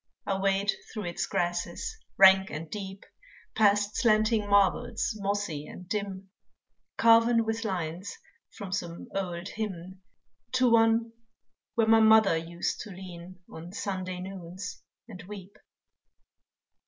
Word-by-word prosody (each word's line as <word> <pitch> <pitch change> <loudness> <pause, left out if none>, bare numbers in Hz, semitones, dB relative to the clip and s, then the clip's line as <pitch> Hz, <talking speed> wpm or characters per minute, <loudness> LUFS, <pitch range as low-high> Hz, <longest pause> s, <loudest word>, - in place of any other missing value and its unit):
I 195 -1 -1
wade 195 +1 +2 0.2
through 215 -4 -5
its 175 - -3
grasses 175 - -2 0.2
rank 190 0 +7
and 155 +1 -7
deep, 195 -2 -7 0.5
Past 205 -1 +3
slanting 215 -2 +2
marbles 200 +3 +2
mossy 195 -7 -2
and 180 - -11
dim, 195 -2 -4 0.7
Carven 230 0 +5
with 225 +1 -2
lines 180 -2 -4 0.4
from 200 -4 -7
some 175 -4 -4
old 185 -1 -3
hymn, 190 -3 -6 0.5
To 255 -2 +3
one 225 0 +4 0.6
where 230 - +3
my 225 0 +6
mother 220 -4 +6
used 170 +1 -3
to - - -7
lean 180 -1 -10
On 165 +2 -10
Sunday 185 -2 -4
noons 185 0 -7 0.3
and 200 -5 -10
weep. 200 -1 -10
195 Hz, 120 wpm, -28 LUFS, 180-215 Hz, 0.7 s, rank